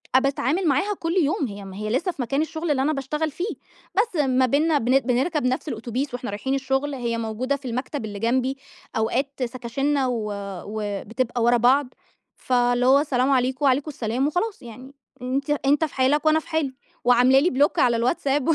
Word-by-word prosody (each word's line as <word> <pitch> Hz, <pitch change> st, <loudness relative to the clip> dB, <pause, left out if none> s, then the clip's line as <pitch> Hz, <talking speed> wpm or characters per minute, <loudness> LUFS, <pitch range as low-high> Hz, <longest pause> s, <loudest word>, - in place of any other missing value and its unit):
أ -, -, +8 dB
باتعمل 280 Hz, +6 st, 0 dB
معاها 345 Hz, +9 st, +2 dB
كل 330 Hz, 0 st, -2 dB
يوم 315 Hz, -5 st, +1 dB
هي 200 Hz, -1 st, -8 dB
م 190 Hz, -, -9 dB
هي 210 Hz, +2 st, -4 dB
لسه 320 Hz, -, 0 dB
في 285 Hz, -, -6 dB
مكان 275 Hz, +5 st, 0 dB
الشغل 320 Hz, 0 st, -2 dB
اللي 265 Hz, -2 st, +1 dB
أنا 305 Hz, +3 st, +1 dB
باشتغل 300 Hz, +3 st, -2 dB
فيه، 360 Hz, +9 st, -4 dB, 0.4 s
بس 430 Hz, 0 st, +1 dB
ما 260 Hz, -1 st, +3 dB
بيننا 300 Hz, +5 st, +2 dB
بن 255 Hz, +1 st, +3 dB
بنركب 265 Hz, +5 st, 0 dB
نفس 255 Hz, +4 st, -1 dB
الأوتوبيس 245 Hz, +2 st, -3 dB
وإحنا 245 Hz, -3 st, -4 dB
رايحين 265 Hz, +7 st, -2 dB
الشغل، 270 Hz, +1 st, -1 dB
هي 235 Hz, -2 st, -2 dB
موجودة 230 Hz, +5 st, -2 dB
في 280 Hz, -2 st, -8 dB
المكتب 255 Hz, +1 st, -3 dB
اللي 205 Hz, -2 st, -6 dB
جنبي، 255 Hz, +4 st, 0 dB, 0.4 s
أوقات 260 Hz, +5 st, -1 dB
سكاشننا 260 Hz, +3 st, -1 dB
و 225 Hz, -4 st, -2 dB, 0.3 s
وبتبقى 220 Hz, +4 st, -3 dB
ورا 240 Hz, +1 st, +4 dB
بعض، 255 Hz, +3 st, +3 dB, 0.4 s
فاللي 245 Hz, -1 st, +1 dB
هو 270 Hz, +2 st, +6 dB
السلام 275 Hz, -2 st, +1 dB
عليكم، 260 Hz, +2 st, +1 dB
وعليكم 275 Hz, +3 st, +2 dB
السلام 250 Hz, +2 st, -1 dB
وخلاص 385 Hz, +7 st, -2 dB
يعني 255 Hz, +3 st, -11 dB, 0.3 s
أنتِ 265 Hz, +3 st, -2 dB, 0.2 s
أنت 290 Hz, +3 st, +3 dB
في 310 Hz, -, -10 dB
حالك 275 Hz, +4 st, +2 dB
وأنا 310 Hz, 0 st, +4 dB
في -, -, -15 dB
حالي، 310 Hz, -4 st, -1 dB, 0.3 s
وعاملة 250 Hz, +2 st, +5 dB
لي 325 Hz, +6 st, +2 dB
بلوك 285 Hz, +1 st, +2 dB
على 240 Hz, -2 st, +4 dB
الWhatsApp 275 Hz, +4 st, +1 dB
265 Hz, 190 wpm, -23 LUFS, 245-290 Hz, 0.4 s, أ